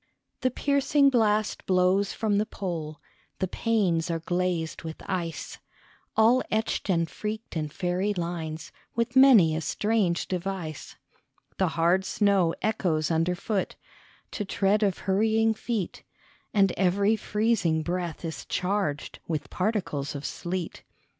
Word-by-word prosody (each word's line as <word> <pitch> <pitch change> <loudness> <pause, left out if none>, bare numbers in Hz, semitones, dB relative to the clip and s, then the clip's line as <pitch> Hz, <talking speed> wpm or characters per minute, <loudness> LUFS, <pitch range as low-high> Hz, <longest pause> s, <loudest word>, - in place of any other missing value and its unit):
THE 255 - +2
piercing 280 +2 +3
blast 215 -3 +1
blows 185 +2 +3
from 210 -2 0
the 215 - +1
pole, 160 -8 -5 0.4
The 190 - -1
panes 185 -6 0
are 165 - 0
glazed 175 -1 -2
with 160 -1 -6
ice, 170 -4 -4 0.6
All 230 +4 +5
etched 220 -1 -1
and 170 -3 +2
freaked 215 +6 -6
in 155 -2 -2
fairy 180 +5 -1
lines, 170 -4 -4 0.2
With 235 +2 -1
many 235 -12 +7
a 160 - -2
strange 205 -1 0
device; 180 -4 -4 0.6
The 190 - +2
hard 175 +3 +3
snow 195 -4 +2
echoes 175 -8 0
underfoot 180 +5 0 0.6
To 210 - -3
tread 200 +1 +1
of 200 -3 +1
hurrying 220 +3 +3
feet, 220 -4 -3 0.5
And 195 -3 +4
every 200 +3 +3
freezing 210 -7 +1
breath 175 -1 -3
is 160 - -5
charged 185 -6 -2
With 155 -3 -3
particles 180 -8 -2
of 140 +1 -5
sleet. 175 -1 -4
190 Hz, 125 wpm, -27 LUFS, 165-215 Hz, 0.6 s, many